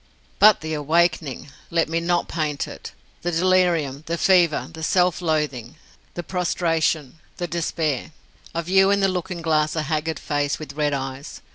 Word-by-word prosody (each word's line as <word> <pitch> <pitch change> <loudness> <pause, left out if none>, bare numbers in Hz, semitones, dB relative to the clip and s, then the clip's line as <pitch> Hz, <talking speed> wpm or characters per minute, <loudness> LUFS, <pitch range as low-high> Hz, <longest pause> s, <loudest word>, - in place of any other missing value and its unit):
But 210 0 +7
the 160 0 -4
awakening! 155 -2 0 0.2
Let 165 -1 +1
me 165 +1 -1
not 175 +1 0
paint 155 -3 -2
it. - - -9 0.3
The 175 - -1
delirium, 170 -5 +2
the 170 +1 -1
fever, 175 -4 +3
the 160 - -9
self 180 +2 +2
loathing, 150 -6 -1 0.4
the 175 - -4
prostration, 165 -4 -1 0.2
the 175 - -2
despair. 160 -4 -2 0.4
I 170 - 0
view 190 +3 +4
in 200 0 +2
the 195 - +4
looking 180 -2 -3
glass 155 -1 +1
a 160 - -1
haggard 155 +1 -2
face, 145 -1 -1
with 150 -3 -8
red 145 0 0
eyes. 135 +2 -6
160 Hz, 160 wpm, -23 LUFS, 150-175 Hz, 0.4 s, But